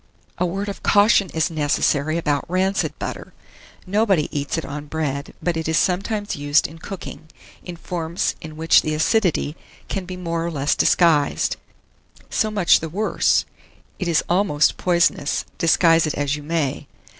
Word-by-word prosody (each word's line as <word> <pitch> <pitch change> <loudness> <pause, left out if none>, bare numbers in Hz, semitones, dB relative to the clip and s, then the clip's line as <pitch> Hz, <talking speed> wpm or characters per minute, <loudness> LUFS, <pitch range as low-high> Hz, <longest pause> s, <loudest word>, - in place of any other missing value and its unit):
A 180 - +1
word 195 +4 -3
of 200 - -6
caution 205 -2 +4
is 160 +2 0
necessary 150 0 +1
about 150 -2 -1
rancid 190 +2 0
butter. - - -6 0.5
Nobody 195 -6 +1
eats 145 +2 -2
it 165 - -3
on 150 +1 -7
bread, 145 -2 -3
but 175 -1 0
it 160 -1 -3
is 160 -1 +1
sometimes 205 +3 0
used 145 +1 +2
in 160 +2 -7
cooking, 175 -3 -8 0.4
in 175 - -7
forms 170 0 -2
in 155 -1 -9
which 160 +1 +5
the 155 0 -2
acidity 165 -3 +1 0.3
can 195 -2 -3
be 180 0 -7
more 170 -2 -3
or 170 - -2
less 145 -3 0
disguised. 160 -5 +2 0.8
So 215 - +1
much 200 -5 +4
the 160 - -5
worse; 205 +7 +1 0.5
it 185 - -2
is 165 -3 +2
almost 175 -5 +2
poisonous, 170 -5 +1
disguise 165 -1 +4
it 155 - -2
as 145 0 -1
you 150 - -7
may. 150 -3 -2
165 Hz, 160 wpm, -21 LUFS, 150-185 Hz, 0.8 s, which